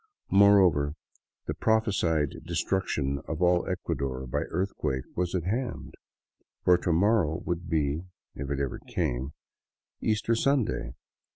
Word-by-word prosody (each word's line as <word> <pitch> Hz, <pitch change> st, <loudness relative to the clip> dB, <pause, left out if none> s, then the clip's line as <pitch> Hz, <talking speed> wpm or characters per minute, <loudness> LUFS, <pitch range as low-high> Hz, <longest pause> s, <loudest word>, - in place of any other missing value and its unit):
Moreover, 95 Hz, -8 st, +5 dB, 0.5 s
the -, -, -2 dB
prophesied 95 Hz, -9 st, +1 dB
destruction 70 Hz, -8 st, -1 dB
of 80 Hz, -, -3 dB
all 90 Hz, -1 st, +3 dB
Ecuador 70 Hz, -8 st, -3 dB
by 60 Hz, -, -1 dB
earthquake 85 Hz, -8 st, -2 dB
was 90 Hz, 0 st, -1 dB
at 90 Hz, -, 0 dB
hand, 120 Hz, +8 st, -3 dB, 0.7 s
for 90 Hz, -, +6 dB
the 85 Hz, -, -1 dB
morrow 85 Hz, -3 st, +2 dB
would 85 Hz, 0 st, -3 dB
be 80 Hz, +1 st, 0 dB
— -, -, -66 dB
if 70 Hz, 0 st, -6 dB
it 70 Hz, -1 st, -1 dB
ever 70 Hz, -2 st, -2 dB
came 65 Hz, +4 st, -2 dB, 0.3 s
— -, -, -66 dB
Easter 110 Hz, +2 st, +1 dB
Sunday. 135 Hz, 0 st, 0 dB
85 Hz, 130 wpm, -28 LUFS, 70-100 Hz, 0.7 s, for